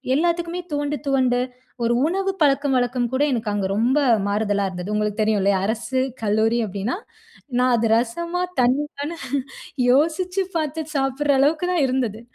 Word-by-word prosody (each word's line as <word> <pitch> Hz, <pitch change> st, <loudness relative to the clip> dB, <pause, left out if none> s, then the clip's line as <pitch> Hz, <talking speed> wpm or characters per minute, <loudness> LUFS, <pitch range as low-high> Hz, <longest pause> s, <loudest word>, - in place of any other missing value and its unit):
எல்லாத்துக்குமே 340 Hz, +2 st, 0 dB
துவண்டு, 290 Hz, 0 st, -1 dB
துவண்டு, 255 Hz, -3 st, +2 dB, 0.4 s
ஒரு 235 Hz, +1 st, +2 dB
உணவு 385 Hz, +3 st, 0 dB
பழக்கம் 280 Hz, -1 st, +3 dB
வழக்கம் 245 Hz, -1 st, 0 dB
கூட 265 Hz, +2 st, +2 dB
எனக்கு 225 Hz, -3 st, -1 dB
அங்க 205 Hz, -1 st, -1 dB
ரொம்ப 245 Hz, +7 st, +2 dB, 0.3 s
மாறுதலா 205 Hz, -1 st, 0 dB
இருந்தது. 180 Hz, +2 st, -6 dB
உங்களுக்கு 210 Hz, 0 st, -1 dB
தெரியுல்லையா? 200 Hz, -2 st, +2 dB
அரசு 235 Hz, +5 st, -1 dB, 0.2 s
கல்லூரி 220 Hz, +2 st, +2 dB
அப்டின்னா, 200 Hz, -, -3 dB, 0.6 s
நான் 250 Hz, 0 st, +3 dB
அது 225 Hz, 0 st, +1 dB
ரசமா? 335 Hz, +10 st, -1 dB, 0.2 s
தண்ணியானு? 285 Hz, +5 st, 0 dB, 0.7 s
யோசிச்சு 335 Hz, +8 st, +2 dB
பாத்து 315 Hz, 0 st, -1 dB
சாப்ற 270 Hz, +1 st, 0 dB
அளவுக்கு 310 Hz, +5 st, +2 dB
தான், 345 Hz, -5 st, +2 dB
இருந்தது. 240 Hz, -4 st, -1 dB
255 Hz, 135 wpm, -22 LUFS, 220-300 Hz, 0.7 s, பழக்கம்